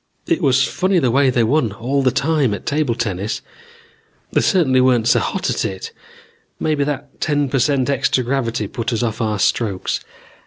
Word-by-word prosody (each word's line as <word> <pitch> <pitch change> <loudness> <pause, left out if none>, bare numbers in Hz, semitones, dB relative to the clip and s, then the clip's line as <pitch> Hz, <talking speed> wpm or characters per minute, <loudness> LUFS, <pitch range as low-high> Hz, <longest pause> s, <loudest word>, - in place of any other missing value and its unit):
"It - - 0
was 135 0 +3
funny 185 0 0
the 130 -8 +2
way 135 +2 +3
they 125 -2 +2
won 120 -2 +1
all 130 +6 -1
the 130 - +3
time 140 -4 +1
at - - -11
table 145 -5 0
tennis. 105 -1 -3 0.9
They - - +2
certainly 135 -9 +3
weren't 125 -3 +3
so 120 - +4
hot - - -2
at - - -1
it. 95 -1 -5 0.7
Maybe 150 -2 0
that 140 -1 -5
ten 145 -2 +1
per 135 - 0
cent 130 0 +1
extra 135 -2 +1
gravity 120 -4 -1
put 115 +3 -4
us 115 0 -1
off 115 0 -2
our 110 -2 0
strokes. 100 0 0
130 Hz, 185 wpm, -19 LUFS, 115-140 Hz, 0.9 s, so